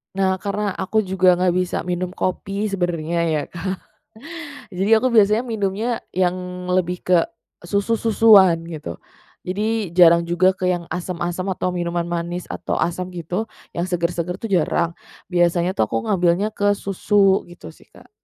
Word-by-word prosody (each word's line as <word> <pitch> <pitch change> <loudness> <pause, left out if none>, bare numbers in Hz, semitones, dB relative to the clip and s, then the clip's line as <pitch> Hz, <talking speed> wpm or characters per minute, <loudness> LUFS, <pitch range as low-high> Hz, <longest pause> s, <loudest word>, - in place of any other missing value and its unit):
Nah 190 -1 +1
karena 205 +1 -2
aku 215 +4 -1
juga 185 -1 +3
nggak 180 0 +2
bisa 180 -1 -1
minum 180 +1 -2
kopi 195 +3 -2
sebenarnya 170 -3 -1
ya 155 -2 0
Kak. 185 +2 -3 1.0
Jadi 195 +4 0
aku 255 - +1
biasanya 215 +3 +4
minumnya 220 +1 -2
yang 180 0 -2
lebih 180 -1 0
ke 180 -1 +5 0.4
susu-susuan 200 -1 +4
gitu. 155 - -7 0.5
Jadi 210 0 -2
jarang 170 -1 +6
juga 175 +2 +3
ke 185 - -3
yang 175 -2 -2
asam-asam 180 +1 -3
atau 180 - -2
minuman 175 0 -1
manis, 175 +1 -3
atau - - -3
asam 180 +2 -2
gitu 180 +5 -3 0.3
yang 170 +1 -1
seger-seger 175 -1 -1
tuh 225 - -4
jarang. 170 -2 +1 0.4
Biasanya 175 0 +2
tuh 110 - +1
aku 115 0 -2
ngambilnya 180 +2 +2
ke 205 -1 +1
susu 195 0 +2
gitu 175 - -11
sih - - -20
Kak. - - -18
180 Hz, 150 wpm, -21 LUFS, 175-200 Hz, 1.0 s, jarang